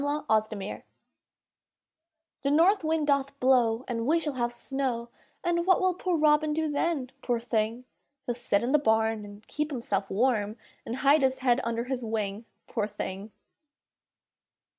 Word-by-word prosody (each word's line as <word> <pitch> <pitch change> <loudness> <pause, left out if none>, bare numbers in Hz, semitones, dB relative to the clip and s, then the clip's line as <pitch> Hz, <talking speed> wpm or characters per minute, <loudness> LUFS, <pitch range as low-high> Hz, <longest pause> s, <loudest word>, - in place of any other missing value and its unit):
POOR 290 +1 -1
ROBIN 215 -2 -1 1.6
The 275 - 0
north 340 +7 +4
wind 315 -1 +1
doth 280 -1 0
blow, 250 -2 +3
And 230 -1 -2
we 320 +3 +4
shall 310 -3 -2
have 240 -2 -1
snow, 240 -1 -3 0.3
And 340 0 0
what 370 - +5
will 370 -1 +2
poor 360 -1 -1
Robin 300 0 +3
do 315 0 -1
then, 285 -4 -1
poor 240 -2 0
thing? 230 +1 -1 0.4
He'll 245 - -1
sit 235 -4 0
in 245 - 0
the 300 - +5
barn, 220 -4 +1
And 205 +1 -12
keep 300 0 -2
himself 210 -8 -2
warm, 215 -1 +1 0.3
And 230 - -3
hide 290 +2 +6
his 265 -1 +2
head 245 0 +4
under 230 0 -1
his 255 0 -3
wing, 215 -1 -3 0.2
poor 210 -3 -2
thing! 205 0 -6
250 Hz, 160 wpm, -28 LUFS, 225-295 Hz, 1.6 s, hide